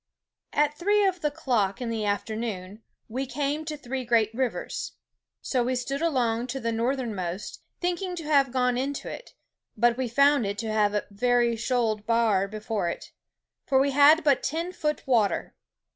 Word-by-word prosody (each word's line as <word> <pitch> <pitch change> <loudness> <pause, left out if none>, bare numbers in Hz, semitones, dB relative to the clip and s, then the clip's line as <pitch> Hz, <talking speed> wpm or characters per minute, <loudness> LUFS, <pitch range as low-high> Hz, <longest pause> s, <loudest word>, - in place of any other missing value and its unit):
"At 295 0 +2
three 405 +6 +2
of 370 -2 0
the 300 - +1
clock 245 -11 0
in 240 -2 -3
the 220 -2 -2
afternoone 205 -1 -3 0.3
we 260 +4 -3
came 285 +4 -2
to 305 -1 -4
three 265 -2 -4
great 230 -2 +2
rivers. 255 +1 -3 0.5
So 255 -3 +1
we 255 +2 0
stood 275 +3 -3
along 245 -7 +1
to 265 +2 -4
the 230 -2 -1
northernmost, 225 -6 -3 0.2
thinking 360 +1 -2
to 335 - -6
have 280 -4 +3
gone 250 -1 +1
into 275 +2 -3
it, - - -8 0.4
but 240 0 +3
we 260 -1 -1
found 280 -1 +4
it 200 +1 -3
to 220 -1 -3
have 210 -1 +2
a 210 - 0
very 240 +2 +2
shoald 225 -3 -1
barre 225 -4 +2
before 215 -3 -2
it, - - -7 0.6
for 265 - +3
we 280 +1 +2
had 290 +4 +6
but 285 -3 +3
ten 330 +5 -2
foot 300 -4 -2
water. 230 -7 +1
245 Hz, 175 wpm, -26 LUFS, 220-285 Hz, 0.6 s, had